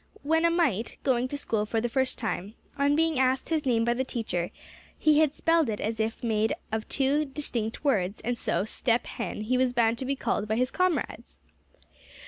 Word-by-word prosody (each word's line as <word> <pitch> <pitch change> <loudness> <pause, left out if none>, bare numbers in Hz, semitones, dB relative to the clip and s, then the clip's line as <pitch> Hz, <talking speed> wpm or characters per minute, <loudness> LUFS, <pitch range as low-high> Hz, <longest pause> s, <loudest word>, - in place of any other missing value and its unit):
When 320 +3 +2
a - - +5
mite, 290 - 0
going 250 -1 +2
to 285 - -4
school 220 -6 -1
for 225 - 0
the 240 - 0
first 260 +2 0
time, 205 -1 -3 0.2
on 285 0 +2
being 320 -3 +2
asked 260 0 +1
his 310 -4 0
name 230 -2 +3
by 235 - +2
the 255 +2 -1
teacher, 215 -9 -2 0.5
he 305 -1 +4
had 310 -2 +3
spelled 330 -4 +2
it 210 - -2
as 220 +1 -2 0.2
made 220 -1 +1
up - - -7
of 220 0 -3
two 280 +2 +2
distinct 265 -6 -3
words; 205 -8 +1
and 245 +2 -1
so 190 -4 -1
Step 230 +2 0
Hen 210 -2 -5
he 250 +4 +1
was 255 -1 +2
bound 230 -1 +2
to 260 - -3
be 275 +2 0
called 215 -5 -1
by 220 - 0
his 250 +2 +1
comrades. 365 -3 -1
250 Hz, 205 wpm, -28 LUFS, 220-285 Hz, 0.5 s, a